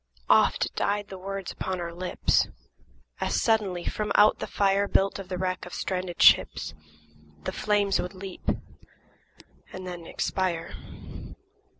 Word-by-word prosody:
Oft -, -, +4 dB
died 205 Hz, 0 st, 0 dB
the 190 Hz, -, -7 dB
words 195 Hz, 0 st, -5 dB
upon 185 Hz, -1 st, -3 dB
our 170 Hz, -1 st, -4 dB
lips, 180 Hz, +1 st, +1 dB, 0.7 s
As -, -, 0 dB
suddenly, 200 Hz, -6 st, +1 dB
from 210 Hz, -1 st, -2 dB
out 210 Hz, +1 st, +6 dB
the -, -, -4 dB
fire 200 Hz, 0 st, +2 dB
Built 195 Hz, 0 st, +2 dB
of 190 Hz, -2 st, -8 dB
the 185 Hz, -, -3 dB
wreck 185 Hz, 0 st, -2 dB
of 180 Hz, -, -7 dB
stranded 180 Hz, -2 st, -3 dB
ships, -, -, +5 dB, 0.7 s
The -, -, -2 dB
flames 205 Hz, -2 st, +1 dB
would 180 Hz, +2 st, -6 dB
leap 190 Hz, 0 st, -6 dB, 1.2 s
and 185 Hz, 0 st, -7 dB
then 175 Hz, -2 st, -7 dB
expire. 170 Hz, -3 st, -2 dB
190 Hz, 135 wpm, -27 LUFS, 180-200 Hz, 1.2 s, out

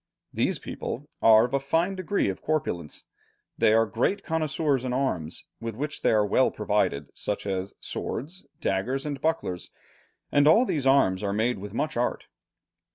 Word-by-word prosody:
"These -, -, +1 dB
people 140 Hz, +5 st, -6 dB
are 110 Hz, 0 st, +7 dB
of 125 Hz, -, -7 dB
a 140 Hz, -, +3 dB
fine 165 Hz, +7 st, +1 dB
degree 185 Hz, +1 st, 0 dB
of 95 Hz, -, -3 dB
corpulence, 90 Hz, -, -2 dB, 0.5 s
they -, -, +4 dB
are 115 Hz, +1 st, +5 dB
great 125 Hz, -, 0 dB
connoisseurs 155 Hz, -4 st, 0 dB
in 125 Hz, -1 st, -2 dB
arms, 90 Hz, -, -2 dB, 0.2 s
with 115 Hz, -2 st, -5 dB
which 150 Hz, +4 st, -4 dB
they -, -, +3 dB
are 105 Hz, -1 st, +3 dB
well 105 Hz, -, +3 dB
provided, 70 Hz, 0 st, -1 dB
such 105 Hz, -, -3 dB
as 95 Hz, -1 st, -3 dB
swords, 170 Hz, +10 st, -5 dB
daggers, 125 Hz, +9 st, -1 dB
and 145 Hz, -2 st, -4 dB
bucklers, 155 Hz, -, -1 dB, 0.6 s
and 145 Hz, 0 st, +4 dB
all 220 Hz, +11 st, +6 dB
these 145 Hz, -, -1 dB
arms 115 Hz, -9 st, +4 dB
are 100 Hz, -1 st, -1 dB
made 115 Hz, +2 st, 0 dB
with 105 Hz, +2 st, -8 dB
much 155 Hz, -1 st, -1 dB
art." 120 Hz, -, -1 dB
125 Hz, 165 wpm, -26 LUFS, 105-150 Hz, 0.6 s, are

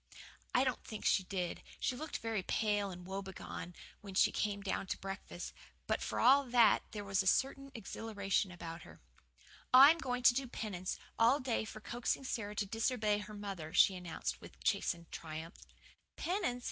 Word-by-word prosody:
I 255 Hz, -, +5 dB
don't 255 Hz, -2 st, -1 dB
think 215 Hz, -, -7 dB
she -, -, +4 dB
did. 180 Hz, -3 st, -3 dB, 0.2 s
She 255 Hz, -, 0 dB
looked 305 Hz, +4 st, -4 dB
very 225 Hz, -3 st, -2 dB
pale 205 Hz, 0 st, 0 dB
and 180 Hz, -1 st, -9 dB
woebegone 190 Hz, -2 st, -6 dB, 0.3 s
when 195 Hz, -2 st, -9 dB
she -, -, +5 dB
came 205 Hz, -1 st, -1 dB
down 195 Hz, -1 st, -2 dB
to -, -, -2 dB
breakfast. 195 Hz, -2 st, -6 dB, 0.3 s
But, -, -, 0 dB
for -, -, -2 dB
all 275 Hz, +2 st, +7 dB
that, 240 Hz, -4 st, +5 dB
there 210 Hz, -2 st, -5 dB
was 195 Hz, -1 st, +1 dB
a 190 Hz, -, -3 dB
certain 275 Hz, +6 st, +1 dB
exhilaration 200 Hz, -3 st, -2 dB
about 170 Hz, -1 st, -7 dB
her. -, -, -13 dB, 0.7 s
"I'm 280 Hz, +6 st, +9 dB
going 250 Hz, -4 st, -2 dB
to 245 Hz, -, +8 dB
do 265 Hz, +1 st, -1 dB
penance 195 Hz, -6 st, -4 dB, 0.2 s
all 240 Hz, +5 st, +5 dB
day 255 Hz, -5 st, -1 dB
for 215 Hz, 0 st, -9 dB
coaxing 240 Hz, +4 st, -2 dB
Sara 210 Hz, -5 st, -3 dB
to 205 Hz, -, 0 dB
disobey 215 Hz, 0 st, +1 dB
her 210 Hz, +1 st, -8 dB
mother," 195 Hz, -6 st, -6 dB
she 190 Hz, -, +6 dB
announced 165 Hz, -, -4 dB
with -, -, -13 dB
chastened 170 Hz, -1 st, 0 dB
triumph. 160 Hz, +1 st, -6 dB, 0.6 s
"Penance?" 350 Hz, -9 st, -1 dB
205 Hz, 170 wpm, -35 LUFS, 190-245 Hz, 0.7 s, I'm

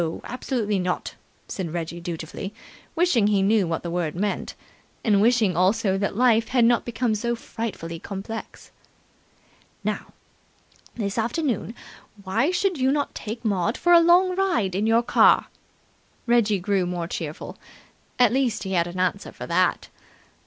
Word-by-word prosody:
Absolutely 235 Hz, -5 st, -2 dB
not!" 180 Hz, 0 st, -2 dB, 0.3 s
said 180 Hz, -5 st, -4 dB
Reggie 170 Hz, 0 st, -4 dB
dutifully, 175 Hz, +4 st, -6 dB, 0.4 s
wishing 320 Hz, -, +3 dB
he 200 Hz, -2 st, +2 dB
knew 205 Hz, -2 st, +3 dB
what 165 Hz, -1 st, -3 dB
the 170 Hz, -, -4 dB
word 170 Hz, -3 st, -2 dB
meant, 200 Hz, +3 st, -2 dB, 0.5 s
and 205 Hz, -3 st, +3 dB
wishing 220 Hz, -5 st, +3 dB
also 190 Hz, +3 st, +2 dB
that 195 Hz, 0 st, -1 dB
life 230 Hz, -1 st, +3 dB
had 245 Hz, -2 st, +3 dB
not 240 Hz, 0 st, +3 dB
become 235 Hz, -1 st, -1 dB
so 235 Hz, +3 st, -1 dB
frightfully 205 Hz, -8 st, -6 dB
complex. 200 Hz, +5 st, -7 dB, 1.1 s
"Now, -, -, -3 dB, 0.9 s
this 205 Hz, -1 st, -2 dB
afternoon, 240 Hz, -, -1 dB, 0.5 s
why 225 Hz, -, +1 dB
should 365 Hz, -2 st, 0 dB
you 260 Hz, +1 st, +3 dB
not 290 Hz, 0 st, -1 dB
take 230 Hz, +2 st, -7 dB
Maud 205 Hz, +2 st, 0 dB
for 350 Hz, -, +3 dB
a 340 Hz, -, +9 dB
long 355 Hz, +2 st, +4 dB
ride 350 Hz, -, +1 dB
in 205 Hz, +4 st, 0 dB
your 230 Hz, +1 st, +4 dB
car?" -, -, +4 dB, 0.8 s
Reggie 235 Hz, -4 st, +3 dB
grew 190 Hz, 0 st, 0 dB
more 175 Hz, -1 st, -3 dB
cheerful. 160 Hz, -3 st, -6 dB, 0.6 s
At 245 Hz, -2 st, +4 dB
least 260 Hz, -4 st, 0 dB
he 190 Hz, -, -5 dB
had 170 Hz, -2 st, +1 dB
an 175 Hz, +1 st, -6 dB
answer 185 Hz, +2 st, -1 dB
for -, -, -8 dB
that. -, -, +1 dB
215 Hz, 150 wpm, -24 LUFS, 185-240 Hz, 1.1 s, a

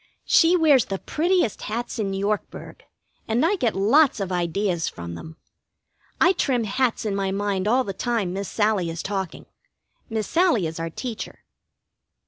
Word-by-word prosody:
She 345 Hz, +2 st, +5 dB
wears 295 Hz, -7 st, +5 dB
the 195 Hz, -, -3 dB
prettiest 340 Hz, -, 0 dB
hats 235 Hz, +2 st, -4 dB
in 200 Hz, -2 st, -1 dB
Yorkburg, 205 Hz, +2 st, -3 dB, 0.5 s
and 230 Hz, +7 st, +2 dB
I 390 Hz, +5 st, +2 dB
get 245 Hz, -, 0 dB
lots 245 Hz, +7 st, +4 dB
of 195 Hz, -2 st, -3 dB
ideas 175 Hz, 0 st, -1 dB
from 85 Hz, 0 st, -8 dB
them. 160 Hz, -, -10 dB, 0.8 s
I 370 Hz, -, +5 dB
trim 260 Hz, -9 st, 0 dB
hats 245 Hz, +2 st, 0 dB
in 205 Hz, -2 st, -1 dB
my 195 Hz, -1 st, -1 dB
mind 200 Hz, 0 st, -1 dB
all 250 Hz, +4 st, +3 dB
the 195 Hz, -, -5 dB
time 215 Hz, -4 st, -1 dB
Miss 195 Hz, 0 st, -4 dB
Sallie 210 Hz, -5 st, +1 dB
is 165 Hz, 0 st, -5 dB
talking 195 Hz, -3 st, -4 dB, 0.6 s
Miss 220 Hz, -2 st, -2 dB
Sallie 330 Hz, -, +2 dB
is 160 Hz, +1 st, -5 dB
our 165 Hz, 0 st, -3 dB
teacher. 230 Hz, +6 st, -7 dB
210 Hz, 160 wpm, -24 LUFS, 190-250 Hz, 0.8 s, She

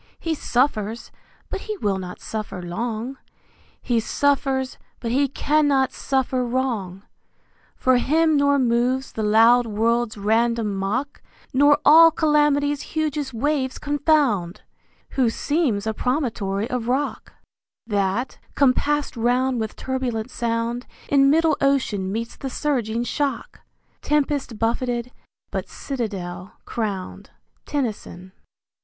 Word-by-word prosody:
He 330 Hz, -, -1 dB
suffers, 240 Hz, -6 st, -1 dB, 0.4 s
but 390 Hz, -, -3 dB
he 430 Hz, -1 st, -5 dB
will 200 Hz, -, -1 dB
not 180 Hz, -1 st, -7 dB
suffer 215 Hz, -4 st, -5 dB
long; 225 Hz, +8 st, -4 dB, 0.6 s
He 240 Hz, -2 st, +1 dB
suffers, 270 Hz, +1 st, 0 dB, 0.2 s
but 230 Hz, -, -3 dB
he 280 Hz, +3 st, +3 dB
cannot 285 Hz, -1 st, +2 dB
suffer 260 Hz, -2 st, 0 dB
wrong: 235 Hz, -7 st, -2 dB, 0.7 s
For 255 Hz, -1 st, +3 dB
him 315 Hz, +5 st, +2 dB
nor 285 Hz, 0 st, +3 dB
moves 255 Hz, +1 st, +1 dB
the 220 Hz, -, -4 dB
loud 225 Hz, +3 st, +5 dB
world's 225 Hz, +1 st, 0 dB
random 225 Hz, +1 st, +1 dB
mock, 230 Hz, +10 st, -2 dB, 0.3 s
Nor 285 Hz, +2 st, +5 dB
all 330 Hz, +2 st, +9 dB
Calamity's 295 Hz, -2 st, +2 dB
hugest 300 Hz, -3 st, -2 dB
waves 265 Hz, +1 st, 0 dB
confound, 285 Hz, -, +1 dB, 0.5 s
Who 255 Hz, -4 st, +2 dB
seems 255 Hz, -5 st, 0 dB
a 220 Hz, -, -1 dB
promontory 230 Hz, -6 st, -1 dB
of 245 Hz, -2 st, -3 dB
rock, 270 Hz, +4 st, -2 dB, 0.5 s
That, 205 Hz, +3 st, -1 dB, 0.2 s
compasst 290 Hz, +2 st, +2 dB
round 245 Hz, +2 st, +1 dB
with 220 Hz, -1 st, -3 dB
turbulent 255 Hz, -3 st, -3 dB
sound 235 Hz, +1 st, -2 dB, 0.2 s
In 275 Hz, -1 st, +5 dB
middle 320 Hz, 0 st, +3 dB
ocean 245 Hz, -9 st, +1 dB
meets 230 Hz, +2 st, -4 dB
the 270 Hz, -, -5 dB
surging 240 Hz, -6 st, -1 dB
shock, 280 Hz, +3 st, -3 dB, 0.4 s
Tempest 290 Hz, -5 st, 0 dB
buffetted 240 Hz, +2 st, -1 dB, 0.4 s
but -, -, -4 dB
citadel 195 Hz, -8 st, -5 dB
crowned. 205 Hz, -5 st, -4 dB, 0.4 s
Tennyson. 215 Hz, -9 st, -4 dB
250 Hz, 115 wpm, -23 LUFS, 220-285 Hz, 0.7 s, all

